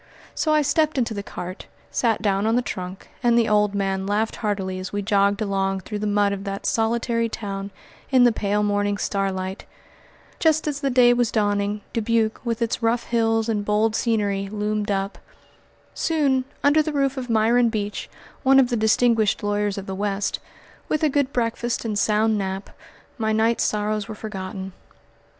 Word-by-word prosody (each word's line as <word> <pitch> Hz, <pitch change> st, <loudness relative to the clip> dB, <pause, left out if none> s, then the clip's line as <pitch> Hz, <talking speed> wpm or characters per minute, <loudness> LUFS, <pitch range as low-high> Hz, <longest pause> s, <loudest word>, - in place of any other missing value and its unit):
So 310 Hz, -, 0 dB
I 305 Hz, -1 st, +4 dB
stepped 310 Hz, +1 st, +1 dB
into 235 Hz, -3 st, 0 dB
the 200 Hz, -, -4 dB
cart, 185 Hz, -2 st, -7 dB, 0.2 s
sat 230 Hz, -2 st, +1 dB
down 200 Hz, 0 st, +1 dB
on 225 Hz, -, +2 dB
the 245 Hz, -, +2 dB
trunk, 185 Hz, -3 st, -6 dB
and 240 Hz, -2 st, +3 dB
the 230 Hz, -1 st, +3 dB
old 210 Hz, -1 st, +2 dB
man 195 Hz, -1 st, -1 dB
laughed 215 Hz, +2 st, 0 dB
heartily 195 Hz, -3 st, -2 dB
as 185 Hz, -, -6 dB
we 205 Hz, 0 st, -2 dB
jogged 200 Hz, +1 st, +2 dB
along 195 Hz, -1 st, -1 dB
through 210 Hz, +3 st, -5 dB
the 210 Hz, -, -2 dB
mud 205 Hz, -1 st, +2 dB
of 195 Hz, 0 st, -5 dB
that 195 Hz, 0 st, -5 dB
solitary 230 Hz, +1 st, +1 dB
town 200 Hz, -2 st, -5 dB, 0.4 s
in 260 Hz, -2 st, +5 dB
the 240 Hz, -, +6 dB
pale 210 Hz, -1 st, 0 dB
morning 205 Hz, 0 st, 0 dB
starlight. 195 Hz, -1 st, -2 dB, 0.7 s
Just 315 Hz, -1 st, +2 dB
as 285 Hz, -1 st, -2 dB
the 275 Hz, -, +1 dB
day 245 Hz, -1 st, +5 dB
was 240 Hz, -2 st, +1 dB
dawning, 205 Hz, -1 st, 0 dB
Dubuque, 225 Hz, -1 st, 0 dB
with 235 Hz, -1 st, -1 dB
its 230 Hz, -, -2 dB
rough 230 Hz, +1 st, +1 dB
hills 225 Hz, -1 st, +1 dB
and 215 Hz, -3 st, 0 dB
bold 215 Hz, +1 st, +1 dB
scenery, 205 Hz, -4 st, 0 dB
loomed 210 Hz, 0 st, -2 dB
up. 195 Hz, 0 st, -2 dB, 0.7 s
Soon, 280 Hz, -5 st, +1 dB, 0.2 s
under 290 Hz, +2 st, +5 dB
the 310 Hz, 0 st, -3 dB
roof 275 Hz, -2 st, +1 dB
of 255 Hz, -2 st, -5 dB
Myron 230 Hz, +2 st, +3 dB
Beach, 210 Hz, -2 st, -4 dB, 0.3 s
one 270 Hz, 0 st, +5 dB
of 255 Hz, -2 st, +3 dB
the -, -, +2 dB
distinguished 220 Hz, -1 st, +2 dB
lawyers 205 Hz, -1 st, 0 dB
of 195 Hz, -, -5 dB
the 195 Hz, -, -5 dB
West, 200 Hz, 0 st, -1 dB, 0.5 s
with 310 Hz, -, 0 dB
a 305 Hz, -, +4 dB
good 280 Hz, -1 st, +1 dB
breakfast 240 Hz, -1 st, -1 dB
and 220 Hz, -, -1 dB
sound 215 Hz, +1 st, +2 dB
nap, 190 Hz, 0 st, -4 dB, 0.5 s
my 220 Hz, -1 st, 0 dB
night's 225 Hz, +2 st, +2 dB
sorrows 210 Hz, 0 st, -1 dB
were 215 Hz, -, -6 dB
forgotten. 190 Hz, -2 st, -6 dB
215 Hz, 180 wpm, -23 LUFS, 200-235 Hz, 0.7 s, the